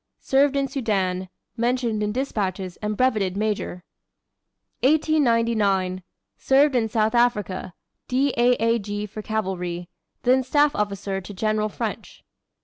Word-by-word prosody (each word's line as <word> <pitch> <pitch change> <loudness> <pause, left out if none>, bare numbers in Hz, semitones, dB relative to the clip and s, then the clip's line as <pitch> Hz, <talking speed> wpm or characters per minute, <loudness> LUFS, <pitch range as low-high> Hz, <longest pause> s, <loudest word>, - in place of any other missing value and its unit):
Served 280 +1 +2
in 275 -1 +1
Soudan, 195 -8 -1 0.3
mentioned 235 -2 0
in 210 0 0
despatches, 195 -7 -2
and 210 -1 -3
brevetted 215 -8 +1
major. 205 -4 -2 1.0
1899. 230 -11 +2 0.4
Served 275 +2 +4
in 225 -2 +1
South 215 +1 +1
Africa. 210 -7 0 0.3
D. 265 +2 +1
A. 240 +1 +4
A. 230 +1 +1
G. 205 0 -4
for 215 +1 -7
cavalry; 180 -5 -3 0.3
then 255 +1 +4
staff 290 +3 +2
officer 200 -1 -2
to 195 +3 -9
General 215 +2 0
French. - - -6
215 Hz, 125 wpm, -24 LUFS, 195-250 Hz, 1.0 s, Served